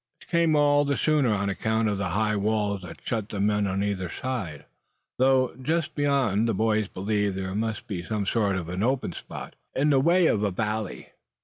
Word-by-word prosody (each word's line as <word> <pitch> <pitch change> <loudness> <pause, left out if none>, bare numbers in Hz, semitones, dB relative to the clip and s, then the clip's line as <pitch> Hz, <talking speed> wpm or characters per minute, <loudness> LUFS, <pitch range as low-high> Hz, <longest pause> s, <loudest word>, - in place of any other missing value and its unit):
This - - -19
came 170 -2 +3
all 145 -1 +4
the 140 -1 0
sooner 150 -5 +2
on 100 -1 0
account 110 +3 0
of 100 -2 -1
the 100 -2 -1
high 105 +3 +1
walls 105 -1 0
that 90 -2 -10
shut 110 -3 -2
them 105 0 +1
in 105 -1 +1
on 95 +1 -1
either 95 -3 -2
side; 95 - -4 0.5
though 130 -1 +3
just 160 +3 -1
beyond 135 -7 +1
the 115 - 0
boys 110 0 +1
believed 100 +1 -1
there 95 0 -3
must 110 +2 -2
be 100 -7 -4
some 105 +2 -2
sort 100 -2 +1
of 85 -3 -3
an 90 +2 -3
open 125 -5 0
spot, - - -8 0.2
in 145 +3 +3
the 135 - +5
way 170 +5 +4
of 105 - +2
a 105 - +2
valley. 105 +1 -3
110 Hz, 205 wpm, -26 LUFS, 100-130 Hz, 0.5 s, the